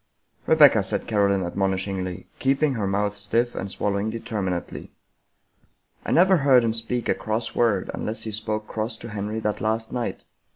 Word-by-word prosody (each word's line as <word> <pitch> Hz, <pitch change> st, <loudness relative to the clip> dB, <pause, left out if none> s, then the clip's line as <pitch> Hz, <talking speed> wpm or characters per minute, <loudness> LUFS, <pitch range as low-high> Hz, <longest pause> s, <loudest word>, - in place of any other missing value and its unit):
" -, -, -36 dB
Rebecca," 145 Hz, -9 st, +7 dB
said 95 Hz, -, -2 dB
Caroline 100 Hz, -3 st, +2 dB
admonishingly, 95 Hz, 0 st, -2 dB
keeping 135 Hz, +2 st, +2 dB
her 105 Hz, -5 st, -2 dB
mouth 100 Hz, +1 st, 0 dB
stiff 115 Hz, +4 st, -1 dB
and 100 Hz, -, -4 dB
swallowing 100 Hz, +1 st, -1 dB
determinately. 100 Hz, -5 st, -4 dB, 0.6 s
" -, -, -39 dB
I -, -, -1 dB
never 185 Hz, +2 st, +5 dB
heard 135 Hz, -4 st, +5 dB
him 115 Hz, -1 st, +1 dB
speak 115 Hz, +1 st, -3 dB
a -, -, +3 dB
cross 110 Hz, +1 st, -3 dB
word, 110 Hz, -6 st, +1 dB
unless 110 Hz, +1 st, -3 dB
he 110 Hz, -, -4 dB
spoke 110 Hz, 0 st, -3 dB
cross 110 Hz, +1 st, -3 dB
to 115 Hz, -, -9 dB
Henry 105 Hz, +1 st, -3 dB
that 105 Hz, -1 st, -2 dB
last 110 Hz, +1 st, -1 dB
night. 120 Hz, -2 st, -3 dB
110 Hz, 170 wpm, -24 LUFS, 100-115 Hz, 0.6 s, Rebecca